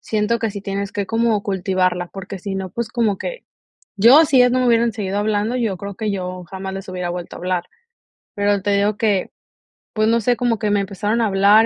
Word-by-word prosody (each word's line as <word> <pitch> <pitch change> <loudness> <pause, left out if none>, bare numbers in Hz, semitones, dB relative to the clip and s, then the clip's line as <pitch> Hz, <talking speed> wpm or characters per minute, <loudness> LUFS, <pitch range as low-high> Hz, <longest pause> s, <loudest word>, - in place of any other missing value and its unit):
siento 220 +2 0
que 225 -2 -2
sí 200 - -6
tienes 200 0 -4
que 200 -2 -2
como 225 -1 +1
cultivarla, 185 -2 0
porque 195 0 -7
si 195 +1 -5
no, 190 -1 -4
pues, 235 +4 -3
como 220 -5 0
que, - - -5 0.5
yo, 245 +10 +7
si 275 -3 +3
ellas 250 0 +6
no 255 - +2
me 255 - +2
hubieran 235 0 +3
seguido 200 -1 -3
hablando, 210 +2 0
yo 225 -6 -1
creo 200 +2 -7
que 215 0 -2
yo 185 -2 -4
jamás 190 0 -5
les 195 0 -7
hubiera 180 -1 -3
vuelto 175 0 -6
a - - -9
hablar. 180 -1 -1 0.7
Pero 205 0 +1
te 205 - 0
digo 205 +1 +1
que, 210 -5 0 0.6
pues, 215 0 +1
no 230 +1 +3
sé, 240 +1 +1
como 240 -3 0
que 215 -2 0
me 205 - +3
empezaron 205 +3 -2
a - - +3
hablar, 200 +3 +5
205 Hz, 225 wpm, -20 LUFS, 190-225 Hz, 0.7 s, yo